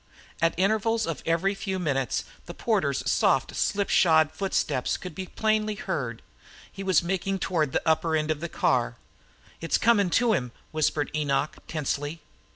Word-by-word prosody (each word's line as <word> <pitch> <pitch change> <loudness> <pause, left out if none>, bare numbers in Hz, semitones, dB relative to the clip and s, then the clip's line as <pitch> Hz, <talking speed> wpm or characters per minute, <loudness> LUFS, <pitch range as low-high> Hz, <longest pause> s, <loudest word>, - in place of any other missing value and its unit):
At 165 0 +2
intervals 220 +4 +2
of 165 -2 -4
every 170 +4 +2
few 195 -1 -3
moments 135 - -1 0.2
the - - -8
porter's - - 0
soft - - +2
slipshod 165 -6 +3
footsteps 190 -9 -1
could 180 -3 -8
be 185 +3 -6
plainly 215 0 0
heard. - - -4 0.5
He 195 - -8
was 190 -2 +3
making 190 +2 -1
toward 160 -7 0
the - - -1
upper 160 0 +2
end 155 0 0
of 155 - -2
the 170 +1 -4
car. - - +1 0.7
"It's 165 - +1
comin' 210 -5 +3
to 230 +5 +3
him," 125 - -2 0.2
whispered 155 -1 0
Enoch, 150 -1 0
tensely. 150 +1 -3
170 Hz, 155 wpm, -26 LUFS, 155-195 Hz, 0.7 s, slipshod